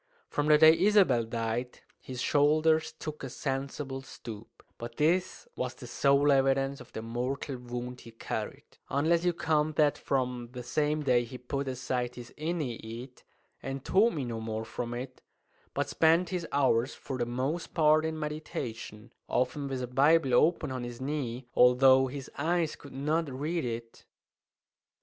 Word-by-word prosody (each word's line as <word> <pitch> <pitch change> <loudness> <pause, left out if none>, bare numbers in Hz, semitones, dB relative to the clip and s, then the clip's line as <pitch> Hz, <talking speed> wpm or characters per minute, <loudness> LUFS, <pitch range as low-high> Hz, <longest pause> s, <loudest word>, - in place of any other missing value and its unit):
From 145 0 -1
the 150 0 +7
day 160 +1 +8
Isabel 195 - +4
died 115 +2 -3 0.2
his 130 -1 -6
shoulders 155 +2 +3
took 155 -1 -7
a 135 - -4
sensible 135 0 -4
stoop; 115 -4 -11 0.2
but 115 0 -7
this 180 - +1
was - - -3
the - - -10
sole 140 +1 +3
evidence 135 0 +2
of - - -14
the 110 - -6
mortal 125 +4 -3
wound 125 0 -6
he 115 - -12
carried, 115 - -5 0.3
unless 160 +5 +2
you 180 - +3
count 155 -2 0
that 150 -2 +3
from 125 -3 -1
the 125 -1 -6
same 150 +3 0
day 125 -3 +3
he 120 +2 -8
put 135 +2 -4
aside 125 -1 -2
his 120 -1 -10
"Aeneid," 130 -6 -4 0.4
and 135 0 -5
taught 220 +5 +4
me 145 -5 -3
no 115 -2 -4
more 110 0 -4
from 120 +1 -4
it, 130 +1 -7 0.5
but - - -1
spent 165 +2 +3
his 180 -3 -3
hours 130 -2 +2
for 135 -3 -6
the 120 - 0
most 135 +8 -3
part 155 -1 +5
in 160 0 -2
meditation, 120 -7 -6
often 130 +3 0
with 130 -2 -3
a - - -3
Bible 135 +2 +3
open 155 +2 +3
on 130 -1 -4
his 120 0 -7
knee 130 -3 -3
although 130 +1 +6
his 135 0 -7
eyes 165 +1 +1
could 145 - -13
not 150 +4 -1
read 155 +6 -2
it. 115 -1 -6
135 Hz, 165 wpm, -30 LUFS, 125-155 Hz, 0.5 s, day